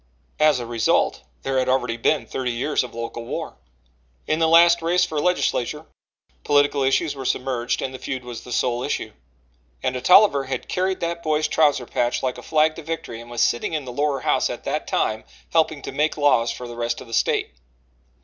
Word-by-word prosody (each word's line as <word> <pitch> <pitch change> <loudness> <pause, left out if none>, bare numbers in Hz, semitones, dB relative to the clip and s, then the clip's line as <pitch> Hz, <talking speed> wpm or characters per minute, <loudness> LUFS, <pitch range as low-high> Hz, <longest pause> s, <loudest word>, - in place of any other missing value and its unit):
As 150 -3 +4
a 120 - -5
result 115 -1 +1 0.2
there 135 -1 0
had 130 0 0
already 125 -2 +1
been 120 +2 +1
thirty 125 +1 -3
years 130 +6 0
of 125 - -9
local 115 0 -5
war. - - -5 0.7
In 155 - 0
the 165 - +3
last 170 +1 +6
race 175 +2 +2
for 155 - -3
legislature, 155 -4 0 0.6
political 145 0 +3
issues 135 +4 +1
were 135 - -6
submerged 125 -1 -1
and 130 - -4
the 130 - -8
feud 130 -2 -4
was 120 -2 -7
the 125 - -11
sole 120 0 0
issue. - - -3 0.7
And 130 - 0
a 125 - -3
Tolliver 180 -6 +6
had 130 -1 -4
carried 185 +1 -1
that 170 0 -2
boy's 155 -1 +1
trouser 145 -5 +2
patch 120 +2 -1
like 130 -1 -2
a - - -9
flag 155 0 +2
to - - -6
victory 160 -8 -5
and 120 - -13
was 120 -1 -2
sitting 120 - 0
in 150 -3 -2
the 125 - -7
lower 145 0 0
House - - +1
at - - -6
that - - -3
time 110 0 0 0.3
helping 155 -3 +1
to - - -5
make 150 +4 0
laws 140 -6 +3
for 125 - -5
the 120 - -8
rest 120 0 -2
of - - -9
the 115 - -12
State. - - +1
135 Hz, 205 wpm, -23 LUFS, 120-155 Hz, 0.7 s, last